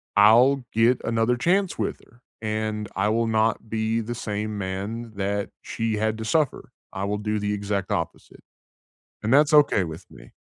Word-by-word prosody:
I'll 120 +6 +6
get 115 +3 +3
another 115 +1 +1
chance 185 +7 +1
with - - -2
her, 120 +2 -24 0.2
and 110 -1 -2
I 95 +2 +1
will 115 +1 +1
not 110 0 0
be 110 +1 0
the 120 +2 -5
same 105 -1 -3
man 100 +4 -4
that 100 +1 -2
she 115 -1 -2
had 110 +1 0
to 110 - -4
suffer. 145 +4 0 0.2
I 95 +1 -3
will 105 +1 -1
do 105 0 -2
the 105 0 -1
exact 100 -1 -2
opposite, 85 - -4 0.8
and 110 +2 0
that's 145 +2 +5
okay 145 -10 +5
with 80 -1 -9
me. - - -15
110 Hz, 170 wpm, -24 LUFS, 105-115 Hz, 0.8 s, I'll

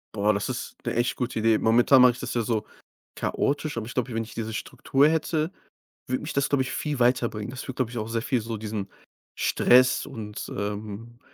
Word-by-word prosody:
Boah. 105 +1 +3
Das 100 0 -2
ist 130 0 -5
'ne - - -1
echt 120 +1 +1
gute 125 -2 -2
Idee. 110 0 +4
Momentan 120 +4 +5
mache 125 -1 +7
ich 125 - -11
das - - -4
ja 120 - +1
so 110 -1 -1 0.5
chaotisch, 145 +1 -1
aber 110 -1 -3
ich 120 - -8
glaube, 125 -1 -1
wenn 115 0 -1
ich 110 - -12
diese 110 -1 -4
Struktur 135 +5 +1
hätte, 160 +1 0 0.6
würde 130 0 -1
mich 155 - -4
das, 140 0 +1
glaube 140 -2 +2
ich, 130 - -5
viel 145 -2 -2
weiterbringen. 120 -3 +1
Das 125 - -6
würde, 130 - -5
glaube 125 -3 -1
ich, 125 - -6
auch 110 - -3
sehr 115 0 -1
viel 125 -4 0
so 115 0 -4
diesen 105 -2 -4 0.5
Stress 130 +1 +4
und, 110 -7 -7
ähm, 105 +3 -5
120 Hz, 215 wpm, -26 LUFS, 110-130 Hz, 0.6 s, mache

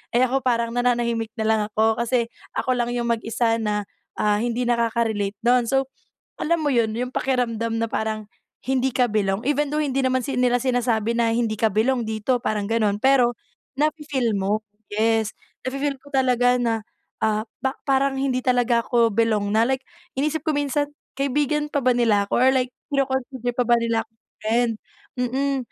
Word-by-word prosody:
Eh, 250 - +5
ako, 265 +2 +1
parang 235 -2 +1
nananahimik 235 -2 +1
na 220 - 0
lang 220 -1 +3
ako 220 +1 +2
kasi 235 0 +1 0.3
ako 255 - +1
lang 240 0 0
yung 235 -1 -1
mag-isa 230 0 0
na, 210 -1 -1 0.3
ah, 210 -1 +2
hindi 240 +1 -1
nakaka-relate 230 -4 0
do'n. 245 0 +4
So, 270 0 +1 0.5
alam 335 +1 +1
mo, 290 - +2
yun 230 -2 +2
yung 250 +1 -3
pakiramdam 230 -3 0
na - - +1
parang 220 -1 -2 0.4
hindi 265 0 +1
ka 250 0 +2
belong, 200 0 0
even 295 0 +1
though 300 - 0
hindi 275 -1 0
naman 260 0 +1
sil 265 -3 -1
nila 245 -1 +3
sinasabi 235 -3 +1
na 230 -1 +2
hindi 230 -2 0
ka 220 - +4
belong 240 +4 +2
dito, 220 +3 0
parang 210 -2 -1
ganon, 215 -3 +1
pero 260 -2 +4 0.5
nafe-feel 290 -7 0
mo, 200 +2 0 0.3
yes, 220 0 +1 0.3
nafe-feel 275 +2 -2
ko 285 - -16
talaga 250 -2 +3
na, 225 -2 0 0.4
ah, 215 -1 +2 0.2
ba 265 0 0
parang 270 0 +2
hindi 265 -2 0
talaga 245 -2 +2
ako 235 -2 +3
belong 215 -2 +2
na 225 - +5
like, 265 0 0 0.4
inisip 305 +3 0
ko 310 - +2
minsan, 290 0 0 0.3
"Kaibigan 295 +2 +1
pa 285 - +1
ba 255 - +5
nila 225 -4 +3
ako, - - -1
or 255 +2 +5
like 255 -1 +1 0.2
kino-consider 265 -2 -1
pa 250 - +2
ba 240 - +5
nila 230 -1 0
akong 225 0 -46 0.2
friend," 230 +2 +2 0.5
mm. 270 +3 0
240 Hz, 175 wpm, -23 LUFS, 225-265 Hz, 0.5 s, Eh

